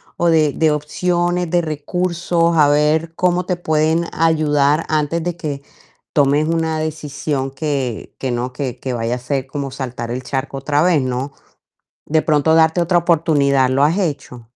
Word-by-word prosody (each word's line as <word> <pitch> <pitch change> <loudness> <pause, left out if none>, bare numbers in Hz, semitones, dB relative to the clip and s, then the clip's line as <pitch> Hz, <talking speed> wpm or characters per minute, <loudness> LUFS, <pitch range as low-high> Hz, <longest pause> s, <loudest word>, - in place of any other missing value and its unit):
o 175 - 0
de, 155 -3 +3
de 160 -1 +2
opciones, 175 +3 -1
de 175 - +3
recursos, 170 +2 -1
a 150 -2 +5
ver 155 +3 +2
cómo 180 0 +1
te 180 -2 -1
pueden 160 0 +1
ayudar 155 -2 +2
antes 155 +2 0
de 175 0 -3
que 145 -4 -5 0.5
tomes 145 +1 +3
una 160 -1 0
decisión 145 -3 -3
que 135 -5 -3
que 130 -2 -2
no 125 +1 -3
que 130 -3 -4
que 130 -2 -4
vaya 115 +1 -1
a - - -4
ser 130 +1 -3
como 140 0 -4
saltar 125 -3 -5
el 130 +1 -4
charco 135 +1 -4
otra 145 +2 0
vez, 170 -5 +3
no? 130 +2 -3 0.7
¿De 155 +1 +2
pronto 155 +1 +2
darte 160 +2 +4
otra 175 +1 +1
oportunidad? 145 -6 +2
¿Lo 135 +2 +2
has 165 +6 +2
hecho? 140 - -4
150 Hz, 170 wpm, -18 LUFS, 135-165 Hz, 0.7 s, a